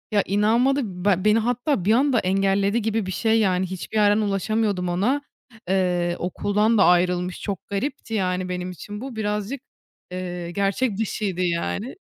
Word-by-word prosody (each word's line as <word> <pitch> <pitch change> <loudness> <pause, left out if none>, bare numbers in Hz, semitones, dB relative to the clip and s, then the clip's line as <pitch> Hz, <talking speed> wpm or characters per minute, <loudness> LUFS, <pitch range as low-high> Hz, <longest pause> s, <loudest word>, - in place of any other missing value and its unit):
Ya, 205 -2 +3
inanmadı. 230 +7 +2 0.2
Ba 190 -1 +2
beni 215 +1 +5
hatta 245 - 0
bir 210 - +3
anda 260 0 +3
engelledi 195 +3 +1
gibi 220 -1 -1
bir 190 - -4
şey, 225 +4 +2
yani 190 -3 +2
hiçbir 190 +4 -5
yerden 205 -1 +4
ulaşamıyordum 200 -2 0
ona. 215 +11 +1 0.5
Eee, 180 -2 +1
okuldan 210 +5 +1
da 195 - +5
ayrılmış. 180 0 +2
Çok 200 -4 -5
garipti, 225 +3 -4
yani, 185 -3 -1
benim 180 0 -3
için 205 +4 -8
bu 265 -2 -7
birazcık, 210 +4 -3 0.5
eee, 180 -1 -5
gerçek 200 +4 0
dışıydı 205 -4 -2
yani. 180 +7 -2
200 Hz, 155 wpm, -23 LUFS, 185-220 Hz, 0.5 s, beni